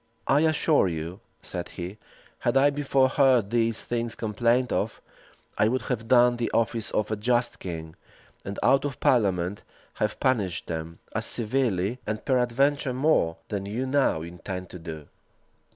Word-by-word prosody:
"I 140 - +4
assure 155 - +3
you," 85 +2 -4 0.2
said - - -4
he, 90 +4 -6 0.4
"had - - +1
I 140 +2 +5
before 140 -2 +2
heard 130 -6 +3
these 115 -1 +1
things 120 -1 -2
complained 120 +3 +1
of, - - -1 0.6
I 105 - +5
would 125 +1 0
have 115 -1 -3
done 120 -1 +5
the 120 - -1
office 115 -1 0
of 105 - -1
a - - +1
just 120 +3 0
king, 80 -3 -6 0.5
and 100 +1 -6
out 135 - +4
of 145 -2 -4
parliament 95 -6 +2 0.4
have 105 0 0
punished 105 -10 0
them, 80 0 -5 0.2
as - - -1
severely, 115 -2 0
and 105 0 -3
peradventure 130 +2 +2
more, 130 - +2
than 100 -1 -3
you 115 +6 -2
now 130 - +1
intend 90 +2 -7
to 90 - -8
do." 80 -3 -8
115 Hz, 155 wpm, -26 LUFS, 95-130 Hz, 0.6 s, I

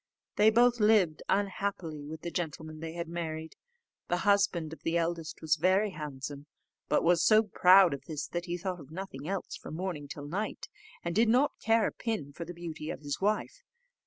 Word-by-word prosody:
They 210 +1 +6
both 240 +2 +4
lived 210 -7 +4
unhappily 190 -6 -1
with 160 +1 -7
the 170 - -5
gentlemen 155 -2 -4
they 160 0 -6
had 170 0 -4
married. 160 -1 -5 0.5
The 175 - +1
husband 195 -6 +2
of - - -11
the 165 +1 0
eldest 165 -2 -3
was 160 0 +2
very 190 +5 +3
handsome, 145 -2 -7 0.4
but - - +3
was 170 0 +4
so 215 0 +6
proud 185 -4 +6
of 140 - -7
this, 155 -3 -4
that 175 0 -3
he 175 -1 -3
thought 185 0 -4
of 145 -3 -12
nothing 160 -4 -7
else 195 0 -3
from - - -8
morning 170 -5 -4
till 145 0 -7
night, 200 +8 -3 0.4
and 170 - -2
did 225 +1 +4
not 255 +5 +3
care 225 -1 +3
a - - 0
pin 165 - -4
for 170 - -6
the 175 - -7
beauty 165 -2 -6
of - - -5
his 145 +2 -4
wife. 215 - 0
170 Hz, 195 wpm, -30 LUFS, 155-200 Hz, 0.5 s, They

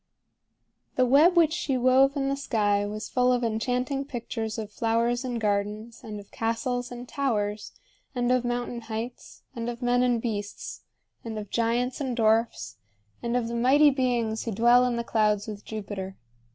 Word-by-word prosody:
The 255 - +4
web 305 +8 +5
which 320 -2 +5
she 285 -6 -1
wove 260 +3 +4
in 275 -1 0
the 275 - +1
sky 205 -7 +1
was 215 +1 -5
full 250 0 +2
of 245 -1 +1
enchanting 250 +5 -1
pictures 230 -4 -4
of 215 -2 -5
flowers 230 +3 0
and 245 -2 -3
gardens, 210 +2 -2
and 215 -3 -6
of 200 - -14
castles 245 +2 -2
and 245 0 -8
towers, 215 -8 -1 0.4
and 245 0 +1
of 255 -1 +3
mountain 240 0 -2
heights, 225 +2 -7
and 235 0 -3
of 240 +1 -6
men 245 0 +3
and 245 -2 +2
beasts, 210 -3 -5 0.4
and 225 -2 -5
of 210 -2 -7
giants 240 +3 0
and 260 -3 -2
dwarfs, 220 - +1 0.4
and 235 +1 0
of 235 -2 -1
the 235 - -5
mighty 270 +5 +5
beings 240 -4 0
who 230 - -2
dwell 240 +4 +5
in 245 -1 0
the 235 - -2
clouds 210 -2 +1
with 210 -2 -7
Jupiter. 200 -3 -6
235 Hz, 175 wpm, -27 LUFS, 220-250 Hz, 0.4 s, web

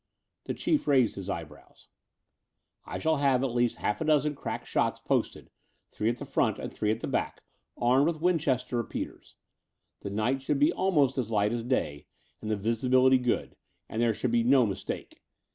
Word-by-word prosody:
The - - -3
Chief 305 - 0
raised 130 -6 +4
his 100 0 -7
eyebrows. 80 -5 -8 1.0
''I - - -4
shall 160 -1 +1
have 135 -2 +2
at 130 -3 -1
least 120 -1 +1
half 105 - -2
a - - 0
dozen 150 -1 +2
crack - - -5
shots - - 0
posted, - - -2 0.4
three 110 - -1
at 120 - -2
the - - -7
front - - +1
and - - -6
three 105 - -1
at 110 +2 0
the - - -3
back, - - -2 0.4
armed 130 +5 +3
with 165 -2 -1
Winchester 145 -8 +1
repeaters. 115 - -5 0.6
The - - -6
night 110 +7 0
should 140 +2 0
be 145 +2 +3
almost 145 -8 +2
as 115 -4 -2
light 105 0 +1
as 120 -1 -2
day, 75 - -2 0.3
and 110 - -5
the 110 - 0
visibility 125 +5 +3
good; 125 -1 -1 0.3
and 110 - -3
there 115 -2 +2
should 125 - -1
be 120 0 +3
no 130 0 +5
mistake. 95 -2 -5
125 Hz, 185 wpm, -28 LUFS, 110-140 Hz, 1.0 s, no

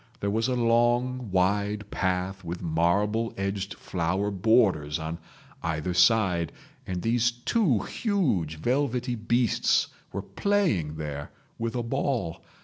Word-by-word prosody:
There 100 - -1
was 110 +3 +1
a 130 - 0
long 120 +1 +2
wide 100 +2 0
path 95 +1 -1
with 85 +1 -5
marble 100 +8 +1
edged 100 0 -2
flower 95 +4 -1
borders 95 -7 +3
on 80 +1 -5 0.4
either 80 +1 -2
side, 90 -3 +3 0.4
and 90 -1 -3
these 120 +1 +3
two 120 - +1
huge 125 - 0
velvety 125 - 0
beasts 120 0 +2 0.2
were - - -4
playing 170 - 0
there 75 -2 -5 0.3
with 115 0 -2
a 120 - -1
ball. 115 - -1
105 Hz, 125 wpm, -27 LUFS, 90-120 Hz, 0.4 s, borders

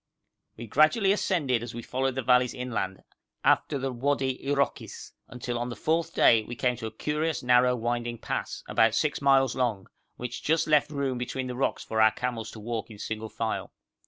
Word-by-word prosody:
We 115 - -7
gradually 155 - +4
ascended 150 - +1
as 120 -1 -7
we 120 - -6
followed 130 +2 -1
the 130 - -2
valleys 125 0 +3
inland, 120 -7 -3 0.4
after 145 - +3
the 135 0 -2
Wadi 135 +1 -1
Iroquis, 140 0 -2 0.2
until 125 -1 -4
on 120 +1 -3
the 120 - -5
fourth 165 +1 -1
day 115 -1 +6
we 120 - -7
came 125 0 +1
to 110 -2 -5
a - - -7
curious 150 +6 -2
narrow 125 0 +4
winding 120 0 -2
pass, - - -4
about 115 0 +3
six 150 +2 0
miles 135 -2 +4
long, 115 -7 -1 0.3
which 125 0 -6
just 160 +1 +2
left 150 -1 +3
room 140 -4 -2
between 130 +1 -3
the 125 -1 -5
rocks 135 - -1
for 110 0 0
our 110 - +7
camels 115 0 -4
to 110 - -10
walk 115 +1 -4
in 110 - -11
single 110 +1 -5
file. 110 0 -3
125 Hz, 190 wpm, -27 LUFS, 115-140 Hz, 0.4 s, our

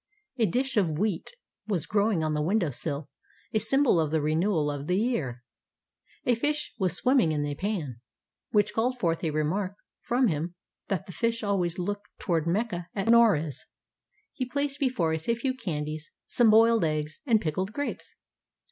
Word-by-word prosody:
A 225 - +4
dish 255 +7 -1
of 165 -7 +2
wheat 200 -2 -1 0.4
was 190 -8 -1
growing 205 -4 +1
on 155 0 0
the 150 - 0
window 175 0 +1
sill, 140 +3 -4 0.5
a 215 - +3
sym 270 +7 +3
bol 235 -11 +4
of 155 -2 +1
the 160 +1 +1
renewal 155 +1 +1
of 145 0 -5
the 180 - +2
year. 155 - -1 0.8
A 245 - +4
fish 295 +6 -1
was 185 -4 +1
swimming 250 - +3
in 145 -1 0
a 145 - -2
pan, 155 - -3 0.5
which 210 0 +2
called 245 +4 0
forth 165 -7 0
a 160 - +1
remark 175 +6 -1 0.3
from 250 +2 +2
him 170 0 -2 0.3
that 195 +1 -2
fish 230 +2 -1
always 185 -4 0
look 205 +3 -2 0.2
toward 165 -3 0
Mecca 180 -2 -1
at 200 +2 -1
Noruz. 185 - +4 0.7
He 260 - -3
placed 280 +3 -2
before 245 - +1
us 160 +6 -4
a 235 - +4
few 260 +3 -1
candies, 155 - -4 0.2
some 240 -2 +4
boiled 225 -1 +6
eggs, 155 -1 -2
and 225 -3 +5
pickled 185 +3 -2
grapes. 285 +5 -5
190 Hz, 175 wpm, -28 LUFS, 155-230 Hz, 0.8 s, boiled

